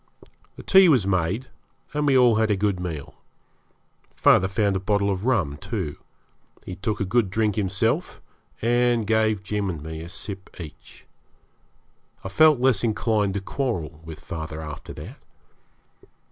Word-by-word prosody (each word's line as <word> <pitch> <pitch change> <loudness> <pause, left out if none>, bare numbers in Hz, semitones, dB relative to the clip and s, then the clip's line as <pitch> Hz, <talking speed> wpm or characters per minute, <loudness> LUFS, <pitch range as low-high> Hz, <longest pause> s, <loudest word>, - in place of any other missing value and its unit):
The - - -11
tea 190 -2 +6
was 125 -10 +4
made, 95 +5 0 0.5
and 150 0 0
we 135 -2 +5
all 120 -3 +5
had 110 0 +2
a 105 - +3
good 100 -1 0
meal. 80 -6 -5 1.0
Father 95 - +4
found 100 0 0
a - - 0
bottle 100 +1 +1
of 95 +2 -3
rum, 90 - +1
too; 90 -4 -4 0.7
he 90 - -6
took 105 +1 -3
a 100 - 0
good 110 +1 +1
drink 105 +2 +1
himself, 95 -2 -1 0.4
and 120 -1 +2
gave 110 -2 +1
Jim 100 0 -2
and 80 -5 -5
me 80 0 -6
a 85 - -8
sip 100 -1 -7
each. 80 -4 -11 1.2
I 95 - -5
felt 155 +5 +5
less 125 -5 +2
inclined 105 -3 0
to 100 - -1
quarrel 90 - -3
with 80 -1 -9
father 80 -1 -6
after 75 -2 -8
that. - - -10
100 Hz, 155 wpm, -24 LUFS, 90-115 Hz, 1.2 s, tea